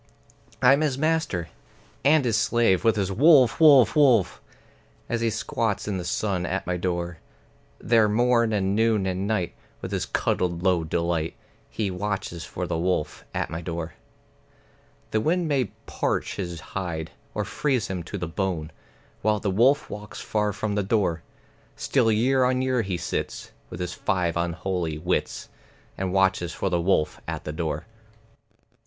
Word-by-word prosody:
I'm 135 +4 +6
his 145 -4 0
master 155 - 0 0.5
(and 145 0 +4
his 115 -3 +2
slave, 110 -3 +2
with 115 -1 +4
his 100 -2 -1
"Wolf, 135 - +5
wolf, 140 -8 +7
wolf!") 125 - +4 0.7
As 120 -1 -1
he 115 - +2
squats 110 -1 -2
in 100 -2 -1
the - - -4
sun 90 +1 -1
at 95 +3 -2
my 90 - -1
door. 85 -1 -3 0.6
There 115 -2 +3
morn 115 +1 +3
and 100 -2 +1
noon 110 -2 +2
and 95 +1 -2
night, 105 -5 -1 0.3
with - - -6
his - - -2
cuddled 85 -1 -1
low 90 -3 +3
delight, 85 0 -1 0.3
He 105 -4 -2
watches 95 -3 -3
for 90 +2 -5
the 85 -2 -2
wolf 90 -3 -1
at - - -3
my 80 +1 -4
door. 85 -1 -5 1.2
The 110 - +1
wind 170 +5 +1
may 140 -4 +2 0.2
parch - - -2
his 85 -4 -4
hide, 80 -2 -5 0.2
or - - -1
freeze 130 -7 0
him 95 -2 -3
to 100 - -5
the 90 -2 -3
bone, 85 -3 -2 0.5
While 105 0 +2
the 100 - -1
wolf 135 +8 +3
walks 105 -3 -8
far 105 -1 0
from 105 +1 -3
the 105 - +1
door; 95 -5 0 0.5
Still 120 -5 +2
year 130 +5 +3
on 130 0 +2
year 130 -2 +1
he 95 -4 -2
sits, - - -4 0.2
with - - -8
his 90 -1 -3
five 90 -5 -1
unholy 85 -1 -2
wits, 90 +3 -2 0.5
And 95 -1 -2
watches 95 -2 +1
for 95 - -2
the 85 -1 +1
wolf 85 -3 +1
at - - -4
the 75 - -5
door. 80 -2 -3
95 Hz, 160 wpm, -25 LUFS, 85-115 Hz, 1.2 s, wolf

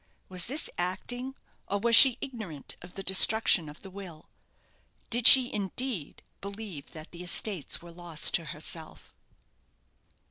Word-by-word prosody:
Was 180 -2 -5
this 285 +6 -1
acting, 245 +9 -6 0.3
or 200 - -4
was 230 +3 +1
she 255 -2 +8
ignorant 215 - -9
of 180 0 -15
the 195 - -9
destruction 190 -3 +4
of 150 - -16
the 195 - -13
will? 180 -5 -14 0.8
Did 240 0 +3
she, 255 -2 +7
indeed, 205 - -5 0.2
believe 200 -7 -10
that 155 0 -13
the 175 - -13
estates 180 -2 -2
were 170 - -14
lost 170 -2 -3
to 170 - -2
herself? 155 +2 -6
190 Hz, 140 wpm, -26 LUFS, 170-225 Hz, 0.8 s, she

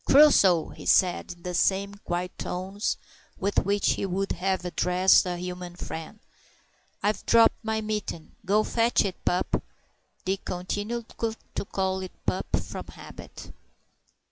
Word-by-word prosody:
"Crusoe," 200 - +6
he - - -10
said, 180 -1 +3
in 175 -1 -22
the 180 - -4
same 195 +3 +2
quiet 180 -2 -4
tones 190 +4 -2 0.4
with 200 +1 +1
which 200 +1 +2
he - - -1
would 195 +2 -1
have 185 0 -1
addressed 180 +1 +4
a 175 -1 -2
human 180 0 -6
friend, 160 +3 -7 0.9
"I've 210 0 +1
dropped 230 0 +5
my 220 0 -1
mitten; 210 -7 -4
go 210 +2 +3
fetch 230 0 +2
it, 190 -2 -5
pup." 180 - +1 0.6
Dick 190 +1 -1
continued 205 +6 -3 0.5
to - - -2
call 190 -1 -1
it 185 - -10
"pup" - - -1
from - - -6
habit. - - -11
190 Hz, 140 wpm, -27 LUFS, 180-205 Hz, 0.9 s, Crusoe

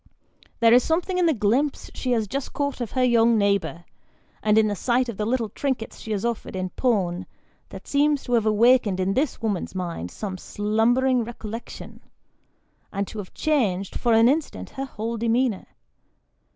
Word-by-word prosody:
There 230 0 +6
is 250 0 +6
something 360 +3 0
in 350 - +3
the - - +4
glimpse 250 +4 0
she 255 - -3
has 220 -3 0
just 275 +6 -4
caught 285 -3 -2
of 235 - -4
her 255 - +2
young 235 -2 +4
neighbour, 190 -5 0 0.6
and 215 0 +3
in 220 -1 +5
the 205 - -1
sight 250 +5 +1
of 225 - -6
the 210 - -1
little 235 -2 0
trinkets 255 0 -3
she - - -9
has 205 +1 -1
offered 235 -4 -3
in 185 -1 -3
pawn, 190 -8 0 0.4
that - - -10
seems 290 0 +2
to 245 - -3
have 225 -2 +3
awakened 215 -2 +4
in 185 +1 +1
this 265 -1 -1
woman's 205 -4 -2
mind 170 - -4
some 190 - -6
slumbering 235 +6 +1
recollection, 225 0 -8 0.9
and 200 0 -2
to 220 - -7
have 195 - -9
changed, 205 -11 0
for 240 -2 +2
an 225 +1 +6
instant, 295 +4 -1
her 270 0 -4
whole 230 -2 -4
demeanour. 230 -1 0
230 Hz, 180 wpm, -24 LUFS, 205-255 Hz, 0.9 s, There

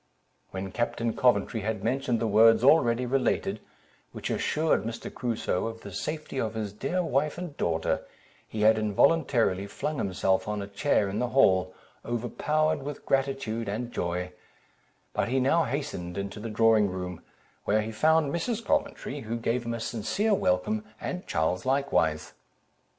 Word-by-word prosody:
When 95 0 -5
Captain 115 +1 -1
Coventry 125 -2 +2
had 105 -1 -3
mentioned 125 0 0
the 115 - 0
words 115 +2 +5
already 125 -4 +4
related, 130 +1 0 0.5
which - - -4
assured 155 -9 +1
Mr. 115 +1 -6
Crusoe 115 -4 -1
of 115 0 -7
the 100 - -9
safety 155 - -4
of 110 -1 -3
his 105 -3 -3
dear 175 - -1
wife 150 0 0
and 175 -5 -6
daughter, 80 - 0 0.5
he 110 - -5
had 110 +1 +5
involuntarily 110 - +2
flung 150 +8 -3
himself 95 0 0
on 105 0 -2
a 100 - -4
chair 100 +2 +1
in 100 +1 -3
the 125 - +1
hall, 95 -8 +3 0.3
overpowered 145 +6 0
with 145 +1 -7
gratitude 135 -5 -1
and 120 +4 -3
joy, 90 -1 -2 0.8
but - - 0
he 130 +2 +2
now 150 +5 +3
hastened 120 -11 -4
into 100 +1 -4
the 115 +2 -5
drawing 110 -1 +4
room, 90 -2 -5 0.4
where 105 +1 +2
he 110 - -5
found 155 +6 +3
Mrs. 225 +7 -2
Coventry, 290 - -1
who 115 -2 -4
gave 120 +1 -1
him 115 - -1
a - - -5
sincere 160 - 0
welcome, 95 - +1 0.2
and 180 0 -5
Charles 80 +4 0
likewise. 130 - +1
115 Hz, 155 wpm, -28 LUFS, 100-140 Hz, 0.8 s, words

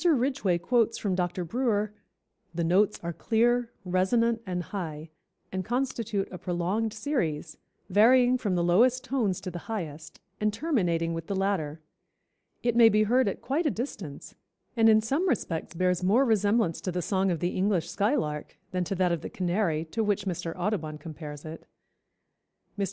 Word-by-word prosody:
Ridgway 260 - +2
quotes 230 +4 +1
from 200 -3 -1
Dr. 180 0 -1
Brewer: 215 0 0 0.6
"The 170 - 0
notes 190 +5 +3
are 170 0 -3
clear, 240 +4 +1
resonant 225 +6 +2
and 180 -1 -2
high, 160 -4 -6 0.4
and 185 0 -2
constitute 230 -4 -1
a 180 - -7
prolonged 185 +5 -1
series, 195 - -2 0.3
varying 245 +6 +5
from 200 -6 0
the 175 - +1
lowest 240 +9 +4
tones 220 -9 0
to 185 - -5
the 175 - -6
highest, 160 -8 -5 0.2
and 215 0 +1
terminating 180 - 0
with 165 -1 -5
the 200 - -2
latter. 175 -6 -1 0.8
It 240 -1 +1
may 230 -1 +8
be 215 0 +3
heard 245 +3 +3
at 195 - -3
quite 300 +6 0
a - - +4
distance, 210 - -6 0.4
and 225 -1 +5
in 220 0 +6
some 280 - 0
respects 165 - -2
bears 180 0 +1
more 225 +9 +4
resemblance 210 -5 +2
to 185 - -2
the 180 0 -2
song 190 +1 +1
of 170 -3 0
the 175 +2 -1
English 185 -3 +1
skylark 170 - -1
than 180 -1 0
to 195 - -2
that 180 -1 +2
of 170 -3 -1
the - - -6
canary, 175 -3 0
to 225 - 0
which 205 -1 0
Mr. 170 -3 -3
Audubon 175 -5 -2
compares 150 -1 -8
it." 160 +1 -9 1.1
Mr. - - -12
195 Hz, 170 wpm, -28 LUFS, 175-230 Hz, 1.1 s, may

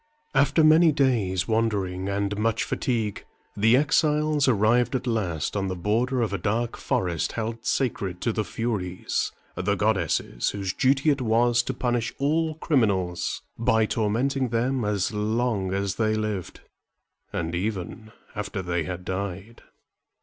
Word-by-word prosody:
After 140 +3 +3
many 155 +1 +6
days' 115 -11 +1
wandering 100 -5 0
and 100 +1 -1
much 110 +1 0
fatigue, 110 -5 -2 0.3
the 110 +4 +4
exiles 150 0 +2
arrived 120 +3 +3
at 130 0 -2
last 100 - -1
on 100 -1 0
the 95 - -3
border 115 +7 0
of 105 - -2
a 100 - -1
dark 115 +6 -1
forest 85 -3 -1
held 115 0 -4
sacred 100 -8 -1
to 115 - 0
the 110 - 0
Furies, 100 -6 -2 0.2
the 100 - 0
goddesses 95 - 0
whose 95 -2 -3
duty 135 +3 +3
it 140 -2 -1
was 120 +1 +3
to 130 +2 -4
punish 120 -2 -1
all 155 +3 +1
criminals 100 - 0 0.2
by 110 -1 +3
tormenting 125 +5 0
them 120 +2 0
as 105 -1 0
long 105 -2 0
as 100 0 -1
they 110 -1 +1
lived, 105 -4 -3 0.7
and 85 0 -3
even 100 +3 -4 0.2
after 100 -2 -4
they 85 -2 -1
had 90 +1 -6
died. 95 +3 -5
110 Hz, 140 wpm, -25 LUFS, 95-125 Hz, 0.7 s, many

